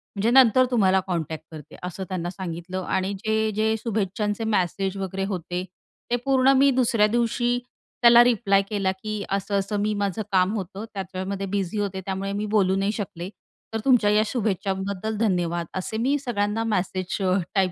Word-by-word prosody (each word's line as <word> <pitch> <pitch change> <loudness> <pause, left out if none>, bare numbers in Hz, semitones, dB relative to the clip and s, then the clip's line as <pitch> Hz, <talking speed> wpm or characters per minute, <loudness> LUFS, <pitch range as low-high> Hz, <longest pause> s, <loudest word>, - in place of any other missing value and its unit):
म्हणजे 205 +3 +1
नंतर 255 -1 +6
तुम्हाला 190 -5 +4
कॉन्टॅक्ट 160 -3 -3
करते 155 -3 -11
असं 180 +2 -5
त्यांना 175 -2 -3
सांगितलं 185 0 -5
आणि 190 +2 -1
जे 220 0 +1
जे 220 +1 +2
शुभेच्छांचे 210 0 -2
मेसेज 195 -2 0
वगैरे 195 0 -3
होते, 180 -2 -3 0.5
ते - - +4
पूर्ण 265 -1 +4
मी 275 +1 +5
दुसऱ्या 235 -4 +3
दिवशी 240 +2 +1 0.4
त्याला 235 0 +8
रिप्लाय 220 -5 +3
केला, 195 -3 0
की 210 +2 -5
असं-असं 200 +1 -1
मी 210 +1 0
माझं 205 0 -1
काम 185 +2 +3
होतं, 200 +1 -5
त्याच्यामध्ये 190 0 -4
बिझी 195 +1 -2
होते 195 -2 -2
त्यामुळे 195 0 -3
मी 205 +1 -2
बोलू 190 -2 +3
नाही 195 +1 +1
शकले. 185 -4 -5 0.4
तर 225 - -1
तुमच्या 245 -6 +4
या 210 +1 +4
शुभेच्छांबद्दल 200 -1 -2
धन्यवाद 175 -5 0
असे 205 +4 -3
मी 270 +5 +1
सगळ्यांना 225 -4 -1
मेसेज 185 -4 -1 0.4
टाईप 190 -2 +3
200 Hz, 160 wpm, -24 LUFS, 190-220 Hz, 0.5 s, त्याला